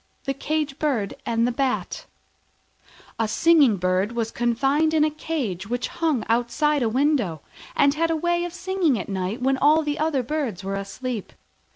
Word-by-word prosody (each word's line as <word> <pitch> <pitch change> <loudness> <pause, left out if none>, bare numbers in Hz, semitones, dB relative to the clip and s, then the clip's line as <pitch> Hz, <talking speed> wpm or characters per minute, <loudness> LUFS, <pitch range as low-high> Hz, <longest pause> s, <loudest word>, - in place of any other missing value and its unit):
THE 275 - -1
CAGE 295 +1 -2
BIRD 255 -10 0
AND 230 0 +2
THE 245 - +1
BAT 260 +1 -2 1.1
A 225 - +1
Singing 285 -3 +4
bird 185 +4 0
was 230 -1 -2
confined 270 +7 +1
in 305 - +4
a 305 - +2
cage 255 - -3
which 245 +1 -2
hung 315 -8 -1
outside 245 +6 +1
a 230 - +2
window, 245 - +1 0.3
and 280 0 +4
had 330 +2 0
a 325 - +1
way 345 +2 0
of 350 - -4
singing 365 -6 0
at 190 - -5
night 195 +5 -3
when 265 0 +2
all 305 +2 +4
other 300 -4 +1
birds 245 - -3
were 195 +1 -3
asleep. 210 +3 -5
265 Hz, 170 wpm, -24 LUFS, 225-310 Hz, 1.1 s, Singing